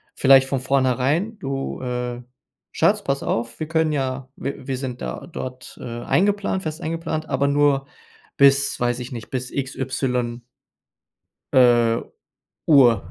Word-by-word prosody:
vielleicht 135 Hz, -1 st, +6 dB
von 135 Hz, -, 0 dB
vornherein: 135 Hz, -, +1 dB
„Du, 135 Hz, 0 st, -4 dB
äh, 125 Hz, -1 st, -4 dB, 0.5 s
Schatz, 205 Hz, 0 st, +2 dB
pass 140 Hz, 0 st, -1 dB
auf, 115 Hz, 0 st, -2 dB
wir 155 Hz, -, -3 dB
können 160 Hz, -1 st, +1 dB
ja 130 Hz, -1 st, -3 dB
w 140 Hz, -, -4 dB
wir 130 Hz, -1 st, -2 dB
sind 130 Hz, -2 st, -5 dB
da -, -, -5 dB
dort, 130 Hz, 0 st, -7 dB
äh, -, -, -7 dB
eingeplant 190 Hz, +11 st, 0 dB
fest 155 Hz, 0 st, -5 dB
eingeplant, 160 Hz, -1 st, -3 dB
aber 140 Hz, -, +1 dB
nur 140 Hz, -1 st, +2 dB, 0.5 s
bis 140 Hz, 0 st, +4 dB
weiß 120 Hz, 0 st, 0 dB
ich 125 Hz, +2 st, -7 dB
nicht, 115 Hz, -3 st, -7 dB
bis 130 Hz, -1 st, -3 dB
X 135 Hz, -1 st, -3 dB
Y“ 125 Hz, -2 st, -2 dB, 1.1 s
„äh, 120 Hz, -2 st, +5 dB, 0.7 s
Uhr”, 120 Hz, -, +5 dB
135 Hz, 140 wpm, -22 LUFS, 125-145 Hz, 1.1 s, vielleicht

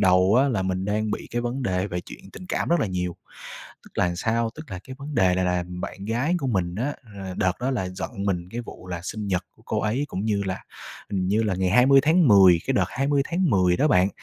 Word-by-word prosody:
đầu 95 Hz, +2 st, +4 dB
á 140 Hz, -, +3 dB
là 105 Hz, -7 st, 0 dB
mình 95 Hz, 0 st, -1 dB
đang 105 Hz, +1 st, -1 dB
bị -, -, -4 dB
cái 120 Hz, -, -1 dB
vấn 120 Hz, +3 st, -3 dB
đề 95 Hz, -3 st, 0 dB
về 90 Hz, -2 st, -3 dB
chuyện -, -, -12 dB
tình 185 Hz, -, -10 dB
cảm -, -, -1 dB
rất 170 Hz, -2 st, +3 dB
là -, -, +1 dB
nhiều. 90 Hz, -2 st, -3 dB, 0.7 s
Tức -, -, -16 dB
là 90 Hz, -1 st, +2 dB
sao? 115 Hz, +4 st, 0 dB
Tức 155 Hz, -7 st, -11 dB
là 90 Hz, -, -5 dB
cái 130 Hz, 0 st, -9 dB
vấn 145 Hz, +1 st, -7 dB
đề 90 Hz, -1 st, +4 dB
này 95 Hz, 0 st, +1 dB
là 90 Hz, -1 st, 0 dB
bạn 90 Hz, +2 st, -6 dB
gái 120 Hz, -, 0 dB
của 135 Hz, -, -3 dB
mình 90 Hz, -7 st, 0 dB
á, 130 Hz, +8 st, -2 dB, 0.2 s
ờ, 95 Hz, -2 st, -6 dB
đợt 95 Hz, -1 st, +2 dB
đó 130 Hz, +2 st, 0 dB
là 95 Hz, -8 st, -1 dB
giận 90 Hz, -, -5 dB
mình 90 Hz, -3 st, -1 dB
cái 120 Hz, +3 st, -4 dB
vụ 105 Hz, -, -11 dB
là 90 Hz, -2 st, -4 dB
sinh 105 Hz, +2 st, -5 dB
nhật 90 Hz, -3 st, 0 dB
của -, -, -22 dB
cô -, -, -1 dB
ấy 115 Hz, +7 st, 0 dB
cũng 95 Hz, -2 st, -4 dB
như 105 Hz, -2 st, 0 dB
là, 95 Hz, -1 st, -4 dB, 0.5 s
hình 95 Hz, -2 st, -1 dB
như 105 Hz, +4 st, +2 dB
là 105 Hz, -4 st, 0 dB
ngày 95 Hz, 0 st, 0 dB
20 135 Hz, +4 st, +6 dB
tháng 160 Hz, 0 st, +4 dB
10. 95 Hz, -5 st, +7 dB
Cái 135 Hz, -, +1 dB
đợt -, -, +3 dB
20 140 Hz, +1 st, +1 dB
tháng 175 Hz, -1 st, +1 dB
10 90 Hz, -4 st, +3 dB
đó 150 Hz, -, +2 dB
bạn, 95 Hz, -6 st, +4 dB
100 Hz, 260 wpm, -24 LUFS, 90-130 Hz, 0.7 s, 10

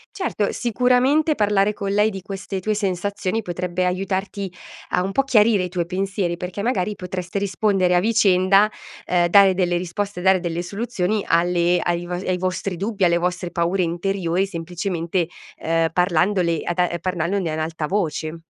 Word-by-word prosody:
Certo, 285 Hz, -, -1 dB
sicuramente 255 Hz, +6 st, +2 dB
parlare 205 Hz, -1 st, +2 dB
con 200 Hz, -1 st, -4 dB
lei 210 Hz, +2 st, +3 dB
di 195 Hz, -2 st, -7 dB
queste 195 Hz, 0 st, -5 dB
tue 215 Hz, +3 st, -1 dB
sensazioni 200 Hz, +1 st, -2 dB
potrebbe 180 Hz, 0 st, -2 dB
aiutarti 190 Hz, +1 st, -2 dB, 0.4 s
a -, -, +1 dB
un 195 Hz, +1 st, -3 dB
po' 275 Hz, -, +2 dB
chiarire 215 Hz, -6 st, +4 dB
i -, -, -3 dB
tuoi 175 Hz, -1 st, -2 dB
pensieri, 190 Hz, -1 st, -2 dB
perché 180 Hz, +3 st, -6 dB
magari 210 Hz, -4 st, -1 dB
potreste 180 Hz, 0 st, -4 dB
rispondere 195 Hz, -2 st, +1 dB
a 175 Hz, -, +4 dB
vicenda, 195 Hz, -1 st, +4 dB, 0.4 s
ehm, 175 Hz, -1 st, +2 dB
dare 195 Hz, +1 st, +6 dB
delle 180 Hz, -1 st, +1 dB
risposte, 180 Hz, +2 st, -3 dB
dare 190 Hz, 0 st, +4 dB
delle 175 Hz, 0 st, -3 dB
soluzioni 205 Hz, 0 st, -2 dB
alle 175 Hz, +1 st, +2 dB
ai 175 Hz, 0 st, -1 dB
vo 180 Hz, -, -4 dB
ai 180 Hz, 0 st, -2 dB
vostri 185 Hz, +1 st, -2 dB
dubbi, 200 Hz, +2 st, -1 dB
alle 170 Hz, -1 st, +3 dB
vostre 180 Hz, 0 st, -2 dB
paure 175 Hz, +3 st, 0 dB
interiori 175 Hz, +1 st, -1 dB
semplicemente, 170 Hz, 0 st, -3 dB, 0.3 s
ehm, 165 Hz, 0 st, +1 dB
parlandone 180 Hz, -1 st, +1 dB
ad 175 Hz, -, -3 dB
a 175 Hz, -1 st, +1 dB
parlandone 180 Hz, 0 st, -1 dB
ad 155 Hz, -, -3 dB
alta 160 Hz, -1 st, -3 dB
voce. 165 Hz, -3 st, -2 dB
185 Hz, 160 wpm, -22 LUFS, 175-200 Hz, 0.4 s, dare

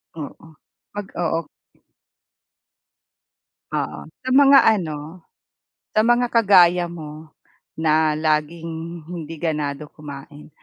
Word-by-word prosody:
Oo, 160 Hz, +1 st, -9 dB, 0.5 s
'pag 205 Hz, -1 st, -5 dB
oo. 165 Hz, -2 st, -1 dB, 2.3 s
Oo, 75 Hz, -, -4 dB, 0.2 s
sa 260 Hz, -, -3 dB
mga 275 Hz, 0 st, +7 dB, 0.2 s
ano, 160 Hz, +1 st, -7 dB, 0.7 s
sa 215 Hz, -, +4 dB
mga 240 Hz, +2 st, +3 dB
kagaya 180 Hz, -5 st, +5 dB
mo 155 Hz, -2 st, -9 dB, 0.5 s
na 155 Hz, -1 st, +2 dB
laging 160 Hz, +1 st, -2 dB
hindi 165 Hz, -2 st, -7 dB
ganado 150 Hz, -2 st, -2 dB
kumain, 150 Hz, 0 st, -11 dB
160 Hz, 90 wpm, -22 LUFS, 150-175 Hz, 2.3 s, mga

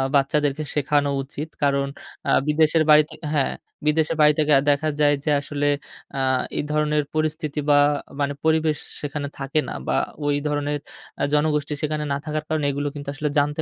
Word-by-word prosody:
বাচ্চাদেরকে 145 Hz, +1 st, +2 dB
শেখানো 145 Hz, 0 st, +1 dB
উচিত। 150 Hz, +3 st, -7 dB
কারণ 140 Hz, -1 st, +2 dB, 0.4 s
আ -, -, +4 dB, 0.2 s
বিদেশের 155 Hz, +1 st, +3 dB
বাড়িতে 150 Hz, 0 st, +6 dB, 0.2 s
হ্যাঁ, 140 Hz, -3 st, +1 dB, 0.3 s
বিদেশের 160 Hz, +1 st, +2 dB
বাড়ি 150 Hz, 0 st, +6 dB
থেকে 150 Hz, -1 st, +3 dB, 0.2 s
দেখা 155 Hz, +2 st, +1 dB
যায় 145 Hz, -1 st, +4 dB
যে -, -, -1 dB
আসলে 145 Hz, 0 st, -2 dB, 0.5 s
আ -, -, 0 dB, 0.4 s
এই -, -, 0 dB
ধরনের 150 Hz, 0 st, +1 dB
পরিস্থিতি 155 Hz, -1 st, -1 dB
বা 145 Hz, -, +6 dB, 0.4 s
মানে 140 Hz, 0 st, 0 dB
পরিবেশ 160 Hz, -1 st, +2 dB, 0.2 s
সেখানে 145 Hz, -1 st, -3 dB
থাকে 140 Hz, +3 st, 0 dB
না -, -, -5 dB
বা -, -, +1 dB, 0.3 s
ওই 145 Hz, 0 st, +2 dB
ধরনের 145 Hz, 0 st, -1 dB, 0.4 s
আ -, -, +2 dB
জনগোষ্ঠী 150 Hz, 0 st, +1 dB
সেখানে 150 Hz, 0 st, -1 dB
না -, -, 0 dB
থাকার 155 Hz, -1 st, -2 dB
কারণে 155 Hz, -2 st, 0 dB
এগুলো 145 Hz, +1 st, -2 dB
কিন্তু 145 Hz, -1 st, -6 dB
আসলে 150 Hz, +1 st, -2 dB
জানতে 150 Hz, +2 st, 0 dB
150 Hz, 170 wpm, -23 LUFS, 145-155 Hz, 0.5 s, বাড়িতে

